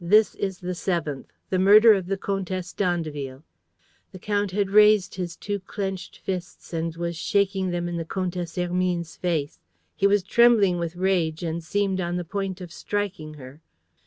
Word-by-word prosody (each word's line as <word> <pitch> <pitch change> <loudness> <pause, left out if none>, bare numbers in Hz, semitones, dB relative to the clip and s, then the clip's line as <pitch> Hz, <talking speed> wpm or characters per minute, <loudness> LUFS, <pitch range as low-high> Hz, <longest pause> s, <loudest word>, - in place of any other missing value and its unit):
This 210 +5 +5
is 190 -2 -3
the 180 +1 -4
seventh: 170 -6 -3 0.2
the 185 - +2
murder 210 +4 +8
of 190 -3 -1
the 195 +1 -1
Comtesse 190 -2 -3
d'Andeville." 155 -7 -2 0.7
The - - -9
count 205 +1 -1
had 195 +1 -1
raised 210 -2 +5
his 175 -2 -4
two 205 0 -3
clenched 190 -1 -5
fists 180 -2 -6
and 165 0 -2
was 170 0 -3
shaking 195 +2 +1
them 175 0 -2
in 175 0 -3
the 165 - -2
Comtesse 175 0 -3
Hermine's 180 -1 -1
face. 160 -5 -2 0.4
He 200 - +3
was 200 -1 +3
trembling 205 -4 +4
with 170 0 -3
rage 175 -3 0
and 165 0 -3
seemed 190 +2 0
on 175 0 -2
the 180 -1 -3
point 195 +1 -4
of 175 -2 -8
striking 195 -8 -3
her. 135 +2 -12
180 Hz, 170 wpm, -25 LUFS, 170-195 Hz, 0.7 s, murder